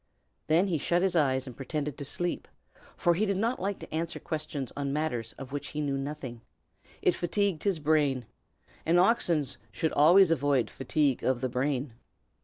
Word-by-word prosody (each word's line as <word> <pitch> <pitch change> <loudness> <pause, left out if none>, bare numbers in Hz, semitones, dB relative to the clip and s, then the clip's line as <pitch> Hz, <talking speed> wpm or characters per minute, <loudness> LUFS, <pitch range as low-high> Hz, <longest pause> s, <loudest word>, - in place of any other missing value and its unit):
Then 165 +5 +4
he 175 -6 0
shut 175 +5 +1
his 190 -2 +1
eyes 130 -5 +2
and 125 -3 -8
pretended 145 +1 -3
to - - -7
be 140 - -2
asleep, 175 +4 -2 0.5
for 175 - +3
he 185 +6 0
did 200 -1 0
not 230 +5 0
like 195 +1 -2
to - - -9
answer 165 +1 -2
questions 150 -4 -4
on 140 -1 -2
matters 140 -7 -2
of 135 -1 -9
which 145 0 -4
he 150 - -5
knew 145 -2 0
nothing; 135 -4 -5 0.6
it - - +4
fatigued 190 0 -1
his 195 -4 +2
brain, 145 -5 +1 0.6
and 170 +2 +3
oxen 175 -6 +3 0.3
should 160 +10 -1
always 170 +5 +6
avoid 140 -5 +2
fatigue 135 0 0
of 130 -2 +1
the 130 - 0
brain. 130 0 -1
150 Hz, 185 wpm, -29 LUFS, 135-175 Hz, 0.6 s, always